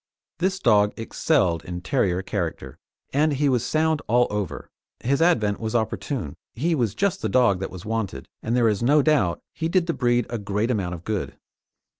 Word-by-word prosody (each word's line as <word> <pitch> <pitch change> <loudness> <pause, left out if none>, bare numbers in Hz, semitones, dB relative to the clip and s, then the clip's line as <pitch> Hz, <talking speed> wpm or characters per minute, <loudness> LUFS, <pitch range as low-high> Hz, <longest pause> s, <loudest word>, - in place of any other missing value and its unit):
This 190 +2 +1
dog 105 - +3
excelled 90 -6 +1
in 90 0 -6
terrier 95 -7 0
character, 90 -4 -4 0.3
and 150 +2 +3
he 145 +1 +1
was 125 -4 +1
sound 160 -1 +1
all 120 +2 +4
over; 105 -4 -4 0.3
his 140 +5 0
advent 110 -13 +2
was 110 0 -3
opportune 110 - -2 0.2
he 165 +9 0
was 115 -9 0
just 195 -1 0
the - - -1
dog 120 -7 +3
that 95 - -3
was 90 -2 -10
wanted, 105 -11 -3
and 115 - -1
there 120 -2 +4
is 105 -3 +1
no 145 +4 +4
doubt 120 - +2
he 160 0 -2
did 180 0 +2
the 170 - -1
breed 120 -3 +1
a 120 - -4
great 105 +4 -1
amount 95 -6 -1
of 85 - -11
good. 105 -1 -3
115 Hz, 190 wpm, -24 LUFS, 100-145 Hz, 0.3 s, all